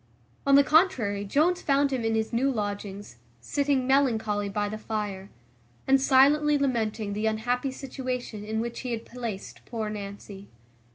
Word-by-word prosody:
On 275 - +6
the 280 - +7
contrary, 255 - +2
Jones 320 - +2
found 280 0 +2
him 250 -3 -1
in 225 0 +1
his 220 0 -1
new 265 +4 +2
lodgings, 205 - -5 0.2
sitting 275 - 0
melancholy 220 -7 +1
by 205 +1 -1
the 215 +1 -5
fire, 205 -3 -4 0.6
and 270 0 +4
silently 290 +3 +5
lamenting 225 -6 -1
the 210 +2 -1
unhappy 245 +5 -1
situation 255 -4 -5
in 220 +1 -2
which 235 0 -4
he 250 -2 -3
had 225 0 -5
placed 230 -5 -7
poor 220 -3 -3
Nancy. 200 -1 -8
230 Hz, 155 wpm, -27 LUFS, 210-270 Hz, 0.6 s, the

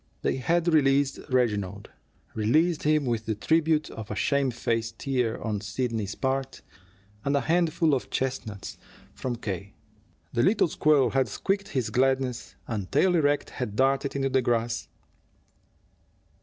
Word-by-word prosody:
They - - +1
had 170 +6 +1
released 140 -2 +3
Reginald, 105 -6 0 0.4
released 155 +10 +2
him 150 -1 +2
with 115 -3 -2
the 110 - 0
tribute 160 +5 +1
of 110 -2 -8
a 105 - -3
shamefaced 115 -2 0
tear 125 -4 -1
on 105 -2 -3
Sidney's 110 0 -3
part, 135 0 -2 0.6
and 140 +1 +1
a 140 - +2
handful 165 -1 +2
of 130 - -1
chestnuts 120 -7 -4 0.3
from 125 -2 -3
K. 100 -3 -5 0.6
The 120 - +2
little 195 - +3
squirrel 150 -4 +3
had 135 -1 +2
squeaked 200 +1 -2
his 130 -4 -2
gladness, 130 -1 0
and, 105 -5 -4
tail 185 -1 +3
erect, 145 -3 +1
had 105 -5 -4
darted 135 +2 +1
into 135 -1 0
the 130 0 +2
grass. 115 -1 -1
130 Hz, 140 wpm, -27 LUFS, 115-145 Hz, 0.6 s, released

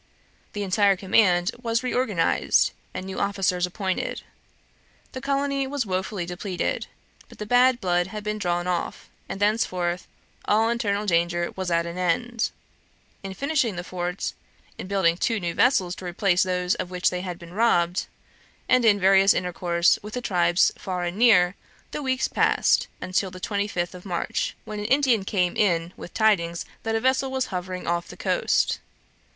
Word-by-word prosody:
The 205 - -3
entire 200 +1 +3
command 185 -1 +3
was 230 0 0
reorganized, 245 -9 +2 0.2
and 185 - -6
new 190 0 -5
officers 190 -3 0
appointed. 190 0 -3 0.9
The 260 - -7
colony 275 0 0
was 275 -2 -2
wofully 190 -1 -2
depleted; 180 +1 -3 0.4
but - - -15
the 210 - -5
bad 245 +2 +4
blood 175 -3 +1
had 210 +2 -7
been 210 0 -3
drawn 175 -2 -1
off, 180 -1 -3 0.2
and 195 - -5
thenceforth 185 -4 0 0.4
all 220 +2 +3
internal 210 -3 -1
danger 170 -1 +1
was 185 -1 -3
at 170 0 +1
an 170 +1 -6
end. 230 +7 0 0.7
In 195 -1 -7
finishing 280 - 0
the 175 - -4
fort, 180 +1 -3 0.5
in - - -6
building 185 -4 +2
two 225 +3 0
new 170 -3 -3
vessels 185 -8 +3
to 185 - -9
replace 180 +1 +1
those 180 0 +1
of 180 - -4
which 180 -1 +1
they 180 0 -3
had 180 -2 -5
been 170 0 -12
robbed, 180 -5 +2 0.6
and 255 -1 +4
in 210 -3 +5
various 195 +1 +5
intercourse 175 -1 +1
with 210 +2 -8
the - - -1
tribes 175 -5 +3
far 180 -2 -3
and 175 +2 -3
near, 195 -7 +5 0.4
the - - -4
weeks 260 -1 0
passed - - +2
until 185 +1 -1
the 185 0 -10
twenty 205 +1 -1
fifth 175 -3 -3
of 180 -1 -11
March, 175 -4 -2
when 215 -1 -6
an 205 - -4
Indian 255 -4 +3
came 185 -3 0
in 175 -4 +1
with - - -10
the - - -7
tidings 170 -6 +2 0.2
that 225 0 -2
a - - +2
vessel 260 +2 +1
was 260 -1 -1
hovering 180 0 -4
off 170 0 -1
the - - -11
coast. - - +1
190 Hz, 170 wpm, -25 LUFS, 175-220 Hz, 0.9 s, in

